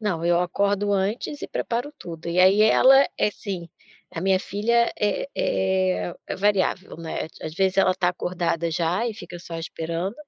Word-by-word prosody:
Não, 180 Hz, -6 st, -2 dB
eu 175 Hz, 0 st, +3 dB
acordo 200 Hz, +3 st, 0 dB
antes 205 Hz, +9 st, -1 dB
e -, -, -5 dB
preparo 245 Hz, +5 st, -3 dB
tudo 170 Hz, -1 st, -8 dB
e, 175 Hz, +2 st, +2 dB
aí, 195 Hz, +3 st, +6 dB
ela 265 Hz, +5 st, +6 dB, 0.2 s
é -, -, +3 dB
assim 190 Hz, -5 st, -6 dB, 0.5 s
a -, -, -2 dB
minha 190 Hz, 0 st, +3 dB
filha 235 Hz, +4 st, +1 dB
é 210 Hz, +6 st, 0 dB
é 185 Hz, -2 st, 0 dB
é -, -, -3 dB
variável, 195 Hz, -2 st, 0 dB
né, 165 Hz, -1 st, -4 dB
é -, -, -9 dB
ti -, -, -16 dB
às 155 Hz, -, -5 dB
vezes, 190 Hz, +1 st, +1 dB
ela 185 Hz, -1 st, +4 dB
tá 180 Hz, -1 st, +1 dB
acordada 175 Hz, -2 st, -2 dB
já 175 Hz, +7 st, 0 dB
e 220 Hz, -, -5 dB
fica 175 Hz, -4 st, -9 dB
só 170 Hz, -1 st, -7 dB
esperando 165 Hz, +4 st, -4 dB
190 Hz, 185 wpm, -24 LUFS, 170-205 Hz, 0.5 s, aí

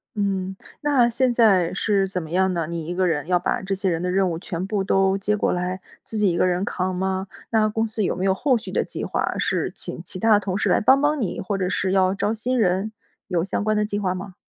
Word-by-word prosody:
嗯。 195 Hz, -2 st, -1 dB, 0.2 s
那 275 Hz, -5 st, +3 dB
现 250 Hz, +1 st, +1 dB
在 195 Hz, -8 st, +4 dB
是 200 Hz, 0 st, +1 dB
怎 185 Hz, -1 st, -3 dB
么 160 Hz, -1 st, -9 dB
样 190 Hz, +1 st, +2 dB
呢？ 165 Hz, -3 st, -2 dB
你 170 Hz, -1 st, -4 dB
一 175 Hz, -, -4 dB
个 185 Hz, 0 st, +1 dB
人 150 Hz, -4 st, -1 dB
要 180 Hz, -1 st, +3 dB
把 -, -, -1 dB
这 195 Hz, +1 st, -3 dB
些 190 Hz, 0 st, 0 dB
人 165 Hz, -1 st, -1 dB
的 180 Hz, -, 0 dB
任 190 Hz, 0 st, +2 dB
务 165 Hz, -, -3 dB
全 175 Hz, +1 st, -4 dB
部 205 Hz, -2 st, -1 dB
都 195 Hz, 0 st, +2 dB
接 210 Hz, +2 st, 0 dB
过 -, -, +1 dB
来， 180 Hz, +1 st, -2 dB, 0.2 s
自 220 Hz, -, -6 dB
己 210 Hz, -2 st, +3 dB
一 170 Hz, -, 0 dB
个 -, -, +3 dB
人 180 Hz, +1 st, 0 dB
扛 185 Hz, -2 st, -2 dB
吗？ 190 Hz, +1 st, -2 dB, 0.2 s
那 215 Hz, -1 st, +3 dB
公 225 Hz, +1 st, -1 dB
司 220 Hz, -1 st, -2 dB
有 -, -, +1 dB
没 185 Hz, -, -1 dB
有 190 Hz, -, +3 dB
后 255 Hz, +6 st, +2 dB
续 225 Hz, -, -8 dB
的 -, -, +2 dB
计 -, -, -6 dB
划， -, -, -1 dB
是 -, -, 0 dB
请 -, -, -7 dB
其 185 Hz, -, -6 dB
他 220 Hz, +1 st, +5 dB
同 195 Hz, -2 st, -2 dB
事 -, -, 0 dB
来 -, -, +3 dB
帮 265 Hz, +5 st, +5 dB
帮 295 Hz, -1 st, +1 dB
你， 200 Hz, -, -2 dB
或 195 Hz, +2 st, -2 dB
者 185 Hz, -2 st, -1 dB
是 190 Hz, 0 st, 0 dB
要 190 Hz, -1 st, +3 dB
招 200 Hz, +2 st, -1 dB
新 245 Hz, +3 st, -1 dB
人？ 195 Hz, +1 st, +1 dB, 0.4 s
有 175 Hz, -3 st, +1 dB
相 200 Hz, -, -2 dB
关 215 Hz, 0 st, +1 dB
的 210 Hz, -, +2 dB
计 205 Hz, -1 st, -3 dB
划 185 Hz, -3 st, 0 dB
吗？ 185 Hz, 0 st, -7 dB
195 Hz, 285 characters per minute, -23 LUFS, 185-215 Hz, 0.4 s, 他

